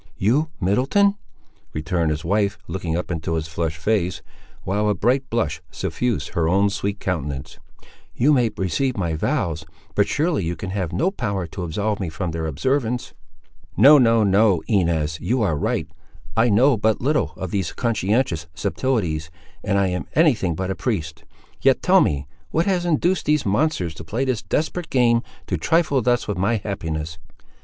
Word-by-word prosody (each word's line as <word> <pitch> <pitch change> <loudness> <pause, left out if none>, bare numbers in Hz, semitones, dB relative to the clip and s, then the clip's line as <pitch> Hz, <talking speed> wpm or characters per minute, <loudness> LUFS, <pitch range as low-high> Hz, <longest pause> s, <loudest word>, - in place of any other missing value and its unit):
"You, 135 +11 +2
Middleton!" 130 - +3 0.6
returned 80 +1 -1
his 75 +1 -3
wife 100 +2 +1
looking 85 -3 -2
up 90 - -4
into 80 0 -2
his 80 -1 -2
flushed 80 0 -3
face, 90 +1 0 0.4
while 105 +3 0
a 105 - +2
bright 130 +7 +1
blush 85 -10 -1
suffused 100 +6 -2
her 80 -1 0
own 100 +3 +3
sweet 100 +1 -3
countenance; 75 -7 -4 0.6
"you 145 +5 +4
may 125 -4 +3
receive 110 - 0
my 85 -4 -1
vows, 80 0 -1 0.3
but 100 - +2
surely 155 - 0
you 85 +1 -2
can 95 +3 -6
have 95 -4 -2
no 135 - +1
power 100 - -2
to 90 +3 -7
absolve 100 +5 -2
me 95 -4 -2
from 85 +1 -4
their 80 0 -3
observance!" 125 - -1 0.6
"No, 145 +1 +8
no, 115 -3 +4
no. 100 -3 +3
Inez, 80 -6 +1
you 120 0 +1
are 90 -7 +1
right. 70 - -1 0.5
I 115 +2 +4
know 125 +5 +4
but 110 +1 +1
little 150 +4 0
of 95 -2 -5
these 100 -2 -1
conscientious 105 -6 0
subtilties, 90 -6 -1 0.3
and 100 -1 +1
I 100 -1 +2
am 90 0 -3
any 155 -2 +5
thing 95 -7 -2
but 95 +3 -2
a - - -2
priest: 85 -5 -3 0.4
yet - - +3
tell - - +5
me, 70 -1 0 0.2
what 165 +2 +1
has 180 -3 0
induced 175 +3 +1
these 150 -1 +2
monsters 100 - 0
to 80 - -9
play 115 +12 -2
this 130 -5 -1
desperate 160 +2 -2
game—to 120 -3 0
trifle 160 -5 +2
thus 120 +1 +1
with 105 -3 -2
my 100 +5 +2
happiness?" 80 -6 -4
100 Hz, 170 wpm, -22 LUFS, 85-125 Hz, 0.6 s, No